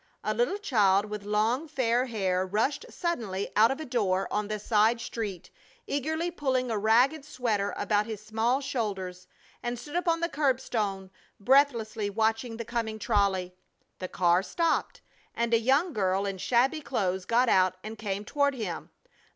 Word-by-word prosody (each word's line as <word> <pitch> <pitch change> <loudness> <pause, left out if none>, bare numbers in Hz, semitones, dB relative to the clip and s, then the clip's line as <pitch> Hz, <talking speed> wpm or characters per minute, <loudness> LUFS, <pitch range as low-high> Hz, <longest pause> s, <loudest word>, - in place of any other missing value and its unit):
A - - 0
little 485 -4 +1
child 210 - +3
with 210 -1 -6
long, 220 +8 +1
fair 255 -3 +1
hair 190 -5 0
rushed 225 - -1
suddenly 225 - -3
out 220 +2 +6
of 270 - -2
a 315 - -5
door 195 -7 0
on 210 0 0
the 215 0 -2
side 220 +2 +2
street, 210 -6 -5 0.3
eagerly 315 +5 -1
pulling 260 -6 -1
a 220 - 0
ragged 245 +8 +3
sweater 230 -8 -1
about 210 0 +1
his 220 -2 -5
small 225 +5 0
shoulders, 195 -9 -4 0.3
and 240 0 -3
stood 295 +6 -9
upon 340 -2 +1
the 335 - 0
curbstone, 235 - -1 0.3
breathlessly 230 -3 +2
watching 225 +2 0
the 230 - -5
coming 225 -2 -3
trolley. 200 -5 +1 0.5
The 185 - -4
car 175 -1 +2
stopped, 330 - -1 0.3
and 235 0 0
a 230 - +5
young 280 +9 +2
girl 195 -2 +1
in 195 -1 -4
shabby 260 - +2
clothes 190 -9 -1
got 240 +4 +3
out 185 -3 +3
and 220 +1 -6
came 205 -2 -4
toward 285 +2 +1
him. 195 -9 -5
225 Hz, 160 wpm, -28 LUFS, 200-265 Hz, 0.5 s, out